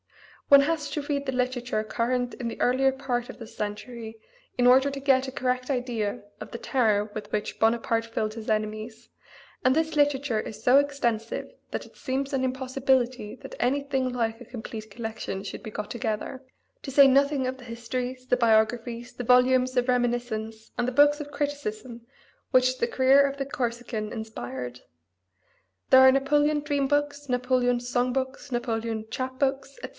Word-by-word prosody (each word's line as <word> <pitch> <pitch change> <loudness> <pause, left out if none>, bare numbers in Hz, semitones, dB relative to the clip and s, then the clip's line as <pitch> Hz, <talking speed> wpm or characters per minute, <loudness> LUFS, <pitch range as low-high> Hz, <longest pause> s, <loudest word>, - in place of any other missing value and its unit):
One 280 0 +8
has 305 0 -1
to 300 - -3
read 280 -1 -2
the - - +1
literature 250 -3 -1
current 245 +3 -1
in 240 -3 -4
the - - -8
earlier 265 +2 +3
part 255 -3 -3
of - - -9
this 230 - -11
century 220 +2 -6 0.4
in 245 0 +4
order 265 +3 +6
to 280 0 -5
get 265 -1 +3
a - - -4
correct 255 0 -1
idea 240 -7 -2 0.2
of - - -8
the - - -5
terror 220 -5 +1
with 210 -1 -7
which 210 -1 -3
Bonaparte 230 0 +2
filled 215 -1 -2
his 225 -1 -7
enemies, 215 +2 -3 0.6
and 255 - +4
this 320 0 0
literature 285 -6 +2
is 215 0 -8
so 250 +4 +6
extensive 240 - -2 0.2
that - - -4
it - - -18
seems 270 +2 -3
an 265 -1 +1
impossibility 255 -3 0
that - - -10
anything 270 0 0
like 230 -2 -2
a - - -9
complete 220 -2 -8
collection 220 -3 -5
should 195 - -7
be 215 - -7
got 210 0 -5
together; 235 +2 -3 0.4
to 270 - -6
say 275 +1 +8
nothing 275 0 +3
of 260 +1 -3
the 260 - -13
histories, 250 +2 -5
the 250 - +2
biographies, 235 +1 +1
the 245 - -5
volumes 255 +1 +4
of 245 0 +2
reminiscence 240 -3 -1
and 245 - +1
the - - 0
books 290 +3 +4
of 290 0 -8
criticism 260 -5 -4 0.5
which 255 -1 +3
the 470 - +1
career 270 - +5
of 280 0 0
the 275 - -2
Corsican 235 -5 -3
inspired, 130 - -6 1.1
there 260 - +9
are 260 0 +9
Napoleon 295 +3 +2
dream 290 -2 0
books, 290 0 -1
Napoleon 250 -1 +1
song 245 +1 0
books, 265 +2 -3
Napoleon 225 -2 -2
chap 260 +2 -4
books, 275 0 -1
etc. - - -7
250 Hz, 175 wpm, -26 LUFS, 230-270 Hz, 1.1 s, there